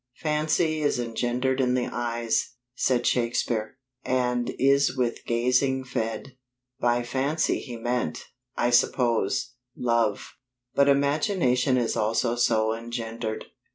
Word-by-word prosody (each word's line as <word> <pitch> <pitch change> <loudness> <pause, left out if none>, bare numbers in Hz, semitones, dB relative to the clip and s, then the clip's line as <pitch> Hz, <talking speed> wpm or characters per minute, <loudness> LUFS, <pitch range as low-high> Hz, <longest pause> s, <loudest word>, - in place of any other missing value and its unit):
Fancy 155 +1 0
is 145 - +1
engendered 120 +3 -1
in 125 -1 +2
the 125 - 0
eyes, 120 0 -2 0.2
said 125 -1 +1
Shakespeare, 115 -1 0 0.3
and 125 -1 0
is 140 0 +3
with 120 -2 -1
gazing 125 +3 +1
fed. 120 +1 -4 0.4
By 120 -1 +2
fancy 135 +6 0
he 120 -4 -7
meant 120 +2 -2 0.3
(I 120 - +2
suppose) 125 +1 +2 0.2
love; 115 -4 0 0.4
but 140 0 +4
imagination 140 -2 +2
is 120 -2 0
also 115 +2 +1
so 110 -2 +2
engendered. 115 -1 -5
125 Hz, 115 wpm, -26 LUFS, 115-130 Hz, 0.4 s, but